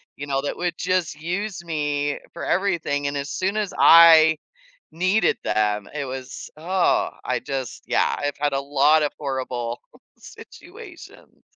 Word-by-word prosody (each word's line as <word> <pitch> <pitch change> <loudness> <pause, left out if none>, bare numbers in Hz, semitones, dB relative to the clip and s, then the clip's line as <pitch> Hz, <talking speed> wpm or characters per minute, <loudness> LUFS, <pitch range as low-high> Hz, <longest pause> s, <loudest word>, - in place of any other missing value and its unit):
you 145 - -7
know, 135 -1 -1
that 145 - -4
would 175 -1 -3
just 180 -4 -1
use 180 +4 -4
me 145 -3 -2
for 170 - -7
everything 165 -7 0
and 140 0 -3
as 140 +1 -4
soon 195 +3 -2
as 210 -3 -2
I 160 -1 +7 0.6
needed 185 +3 +1
them, 105 -1 0
it 145 -2 -3
was, 130 0 -7
oh, 180 +3 +1
I - - -1
just 135 -3 -5
yeah, - - +1
I've 145 0 -3
had 145 -1 0
a 135 - 0
lot 145 +2 +3
of 150 - -1
horrible 130 -4 -4 0.4
situations. - - -14
150 Hz, 150 wpm, -23 LUFS, 140-175 Hz, 0.6 s, I